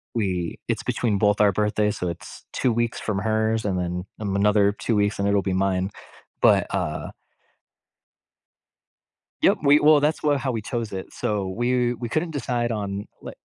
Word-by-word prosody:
we 90 -6 -2
it's - - -1
between 110 -5 0
both 105 0 +3
our 105 -1 +5
birthdays, 105 +1 0
so 90 - -2
it's 85 - -9
2 125 - +1
weeks 120 0 -1
from 100 -3 -2
hers, 110 +1 0
and 95 -3 0
then, 90 0 -3
um, 100 -2 -2
another 100 0 +4
2 115 +2 -2
weeks, 105 0 +1
and 100 - +1
it'll 100 0 +3
be 95 - -1
mine. 95 0 0 0.5
But, - - +5
uh - - -3 2.3
Yep, - - +4
we 145 +1 +6
well, 150 0 +6
that's 150 +2 0
what 145 -1 +3
how 135 -1 -1
we 115 -2 -3
chose 115 0 -4
it. 95 -1 -6
So, 100 -3 -2
we 120 +4 +1
we 120 0 -5
couldn't 160 +6 -1
decide 120 -4 -1
on 100 -2 -3 0.2
l - - -6
105 Hz, 180 wpm, -24 LUFS, 100-120 Hz, 2.3 s, we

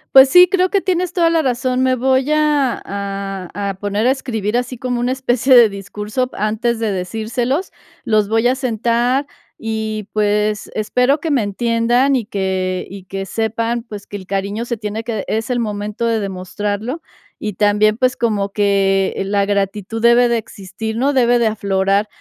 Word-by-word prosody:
Pues 265 0 +10
sí, 360 +4 +8
creo 370 -1 +2
que 395 0 +1
tienes 365 -1 -1
toda 340 -2 +3
la 330 -1 +2
razón, 255 -1 0
me 260 0 +2
voy 260 +2 +1
a 295 -4 +1
a 195 -1 -5
a - - -2
poner 205 +3 -2
a - - +5
escribir 230 -5 -2
así 250 +1 -3
como 245 0 -2
una 245 +1 0
especie 260 0 +2
de 235 -3 +8
discurso 210 +5 -4
antes 220 +3 -1
de 225 -2 -1
decírselos, 225 - -2 0.3
los 215 -4 +2
voy 225 +3 +2
a 255 - +1
sentar, 245 +2 0 0.4
y 220 -2 -3
pues, 210 0 0
espero 250 +6 +1
que 325 - -2
me 265 -6 +2
entiendan 235 +5 +1
y 235 - -3
que 190 -3 -2
y 195 0 -9
que 195 +1 -5
sepan, 230 +2 -2
pues, 210 -3 -9
que 205 - -7
el 190 -2 -12
cariño 200 +4 -2
se 235 - -2
tiene 215 0 -5
que 220 -4 -3
es 225 +3 -2
el 245 - 0
momento 210 +1 -3
de 230 -1 +1
demostrarlo, 205 - -4 0.4
y 210 -1 -2
también, 210 +2 +2
pues, 255 +1 +1
como 210 -4 0
que 195 -1 +1
la 200 0 +1
gratitud 205 +2 -2
debe 235 +1 +5
de 235 -1 +1
existir, 220 +1 -6
¿no?, 270 +4 +2
debe 245 -2 +3
de 235 - +3
aflorar. 200 -1 0
220 Hz, 180 wpm, -18 LUFS, 205-250 Hz, 0.4 s, Pues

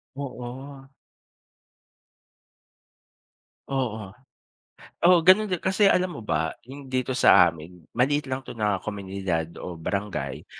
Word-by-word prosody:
Oo. 135 0 -8 2.8
Oo. 115 -6 -2 1.0
Oo, 180 +1 +7
gano'n 205 +3 +6
din, 180 - 0
kasi 195 +3 +3
alam 180 -1 +1
mo - - -7
ba 80 -4 -1
'yung 140 0 -10
dito 130 0 -1
sa 90 -7 +7
amin 85 +2 -13
maliit 140 +3 +1
lang 130 0 -2
'to - - -8
na 105 -3 0
komunidad 95 -5 -3
o 90 - -6
barangay, 100 +4 -4
120 Hz, 115 wpm, -25 LUFS, 95-140 Hz, 2.8 s, Oo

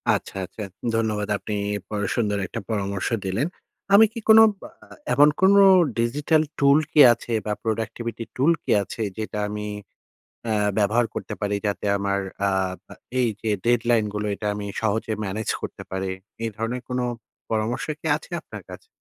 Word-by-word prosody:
আচ্ছা, - - -6
আচ্ছা। 105 - -11 0.3
ধন্যবাদ 110 -2 0
আপনি 105 - -6 0.3
পর 105 -1 -3
সুন্দর 105 -3 0
একটা 115 - -5
পরামর্শ 100 -3 -2 0.2
দিলেন। 95 +10 0 0.5
আমি 215 +2 +9
কি - - -5
কোনো 220 0 +10 0.2
বা - - -9 0.2
আ - - -22 0.3
এমন 145 +1 +6
কোনো 200 +1 +6 0.4
ডিজিটাল 145 +6 +2 0.2
টুল 140 0 +6
কি 150 - +2
আছে 120 - -6
বা 105 - 0
প্রোডাক্টিভিটি 115 +1 -3
টুল 140 +6 +3
কি - - -2
আছে 115 - -7 0.2
যেটা 110 -1 -4
আমি 105 0 -4 0.8
অ্যা 110 - 0 0.3
ব্যবহার 110 +3 +2
করতে - - -5
পারি? 105 -1 -1
যাতে 100 0 -2
আমার 100 0 0 0.3
আ - - +3 0.4
আ - - -9 0.3
এইযে 110 -2 -1
ডেডলাইনগুলো, 115 -3 +1
এটা 105 - -6
আমি 105 0 -5
সহজে 110 0 -1
ম্যানেজ 105 +3 -4
করতে - - -6
পারি। 95 0 -2 0.3
এই 115 - -1
ধরনের 115 +3 -3
কোনো 125 0 -1 0.5
পরামর্শ 110 +2 -1 0.2
কি - - -7
আছে 155 - -12
আপনার - - -10
কাছে? 450 - -11
110 Hz, 160 wpm, -24 LUFS, 105-120 Hz, 0.8 s, কোনো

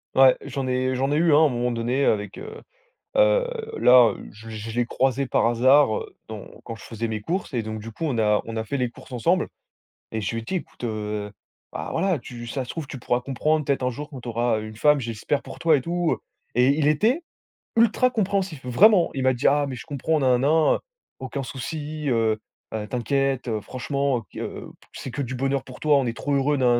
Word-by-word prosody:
Ouais, 130 -1 +7
j'en 135 -2 -4
ai 130 0 0
j'en 135 +2 0
ai - - +2
eu 165 0 +4
un 145 - +7
à - - +7
un 155 -2 +5
moment 120 0 -1
donné, 120 +4 0
heu, - - +5
avec 105 -1 -5
heu 440 +2 -9 0.5
heu - - +4 0.3
là, 125 -2 +7 0.2
je 110 +2 -12
je 110 +1 -6
l'ai 120 +1 0
croisé 135 +1 +1
par - - +2
hasard, 125 +1 +4
heu, - - -10
dans 110 -3 -8 0.2
quand 115 - -6
je 110 - -13
faisais 115 0 -4
mes 110 -1 -3
courses 175 - -3
et 120 - 0
donc 110 0 -5
du 115 +2 -8
coup, 160 - -4
on 130 -6 -1
a 105 -1 +3
on 115 0 -6
a 110 - -1
fait 125 +6 -3
les 125 -2 0
courses 120 - -15
ensemble 165 +9 +1 0.6
et 110 -1 -3
je 100 - -2
lui - - -1
ai - - -10
dit: 190 - -3
«Écoute, 145 - -7
heu, 105 -2 -3 0.4
bah - - -5
voilà, 190 -5 +1
tu 120 -1 -9
si 115 - -6
ça 135 - -1
se 125 - -9
trouve, 160 -4 -5
tu 135 - -7
pourras 120 +1 0
comprendre, 150 +4 0
peut-être 140 -2 +1
un 125 - +1
jour 145 +4 -7
quand 130 -4 -10
tu 120 - -7
auras 115 0 +1
u 110 - -6
une 110 - -11
femme, 150 +5 +4
j'espère 120 +4 -2
pour - - -10
toi 160 -2 +4
et 135 - -2
tout 170 +2 0
heu» - - 0 0.4
et 125 +2 +4
il 150 - +3
était 225 - +2 0.5
ultra 230 +2 +4
compréhensif. 195 - -1
Vraiment, 175 - +5
il 135 - -1
m'a 130 - +4
dit: 125 +2 +1
«Ah, 145 +1 +3
mais 130 - -5
je 115 - -9
comprends, 150 +2 0
nin 130 -3 +4
nin 135 +3 +1 0.3
nin, - - -1 0.4
aucun 135 +1 -5
souci 150 +3 -5
heu, 115 -2 +2 0.4
heu, 105 -1 -4
t'inquiète, 135 +2 0
heu, 110 -2 -1
franchement, 140 +1 -1
heu, - - -9
qu - - -9
heu, - - -6 0.3
c'est 130 - -7
que 140 +3 -3
du 130 - -5
bonheur 135 +1 0
pour 130 -1 -12
toi, 150 -2 +4
on 135 - +1
est 115 - -2
trop 140 +3 -1
heureux, 145 +2 +2
nin 125 -2 +4
130 Hz, 245 wpm, -24 LUFS, 115-150 Hz, 0.6 s, Ouais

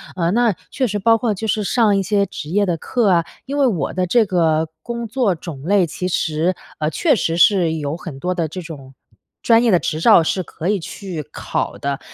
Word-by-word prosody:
呃， 170 -2 0
那 235 +1 +3 0.2
确 260 - 0
实 205 -1 -2
包 225 +3 +3
括 225 -3 0
就 220 - -5
是 215 0 0
上 215 0 +2
一 195 - +2
些 200 +1 +1
职 155 -5 -8
业 205 +4 +2
的 175 -3 0
课 230 +5 0
啊， 170 -2 +3 0.2
因 280 +2 -4
为 275 - +4
我 180 - -1
的 185 0 0
这 230 +5 +3
个 160 -4 +1
工 235 +2 -5
作 220 -4 0
种 160 -4 -8
类 195 +2 +3
其 180 +3 -4
实， 170 0 0 0.2
呃， 155 - 0
确 295 - +2
实 165 -6 -1
是 175 -2 +4
有 150 -1 -3
很 165 -5 -8
多 180 +5 -1
的 170 -3 -1
这 165 +5 -7
种 140 -6 -10 0.5
专 230 0 +5
业 240 - +3
的 180 - +5
执 155 - -3
照 165 - +6
是 185 +4 -1
可 165 0 -6
以 205 -1 +1
去 180 -1 -6
考 - - -3
的， 140 -1 -3
185 Hz, 240 characters per minute, -19 LUFS, 165-215 Hz, 0.5 s, 照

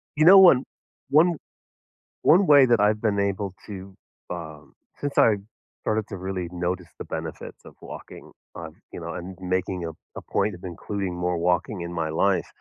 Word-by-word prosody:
You 155 - +3
know, 195 +3 +10
one 175 -9 +7 0.5
one 160 +3 +4 0.9
one 185 +4 +5
way 140 -3 +8
that 120 -3 +3
I've 105 +1 +2
been 105 -3 +1
able 100 -1 -1
to, 95 -1 -8 0.4
um, 80 -4 -8 0.3
since 145 -1 -4
I 110 - +6 0.5
started 110 -1 -1
to 100 - -7
really 95 -1 -4
notice 90 0 -3
the - - -7
benefits - - -7
of - - -14
walking - - -11 0.2
on, - - -8 0.2
you - - -7
know, - - -6
and 90 +1 -7
making 90 -1 -2
a 80 - -4 0.2
a - - -6
point 105 - +1
of 85 - -15
including 95 +1 -4
more 90 0 -1
walking 90 +3 0
in 85 0 -5
my 80 -2 -2
life, 95 +4 +1
95 Hz, 175 wpm, -25 LUFS, 90-110 Hz, 0.9 s, know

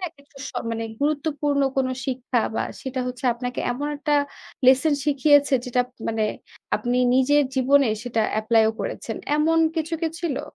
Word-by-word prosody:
না? 370 - -3
একেকটা 285 -3 -20
সময় 230 0 -3
গুরুত্বপূর্ণ 290 -1 0
কোনো 260 -1 +1 0.2
শিক্ষা 250 -2 -1
বা - - 0 0.2
সেটা 260 -1 -4
হচ্ছে 250 +2 -6
আপনাকে 245 +1 -4
এমন 285 +4 -3
একটা 295 0 0 0.5
লেসন 270 +4 +5
শিখিয়েছে 285 -1 +4
যেটা 250 0 +1
আপ - - -19 0.2
মানে 225 -1 0 0.5
আপনি 245 0 -1 0.2
নিজের 290 +3 +4
জীবনে 265 0 +4
সেটা 235 -2 -1 0.2
এপ্লাইও 220 0 +3
করেছেন, - - -4 0.2
এমন 320 +2 +3 0.2
কিছু 320 +1 -1
কি 330 - 0
ছিলো? 320 -6 -2
270 Hz, 155 wpm, -23 LUFS, 250-295 Hz, 0.5 s, লেসন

